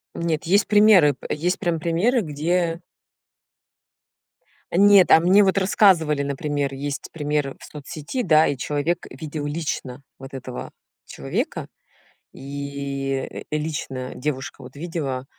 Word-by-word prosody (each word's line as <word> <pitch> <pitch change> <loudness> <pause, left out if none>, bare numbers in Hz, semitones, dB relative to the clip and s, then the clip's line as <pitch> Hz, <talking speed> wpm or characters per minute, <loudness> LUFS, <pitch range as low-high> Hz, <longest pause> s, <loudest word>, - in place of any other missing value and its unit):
Нет, 165 -2 -1
есть 200 +4 +3
примеры, 205 -8 +6
п - - -8
есть 175 +4 -1
прям 170 -2 -1
примеры, 185 +10 +1
где 165 +2 -1 1.9
Нет, 200 +1 +6
а - - +9
мне 190 +5 +5
вот 190 0 +2
рассказывали, 175 -7 +3
например, 140 0 -2
есть 140 +1 -5
пример 150 -3 -2
в - - -12
соцсети, 150 - -6
да, 155 -3 +5
и 140 - -1
человек 150 +6 -2
видел 150 +2 -6
лично 145 -4 -4 0.2
вот 135 0 -11
этого 130 -1 -7 0.3
человека, - - -4 0.7
и 140 -1 -5
лично 150 -4 -4
девушка 135 -1 -4
вот 125 +2 -12
видела, 145 -5 -4
150 Hz, 120 wpm, -23 LUFS, 140-175 Hz, 1.9 s, а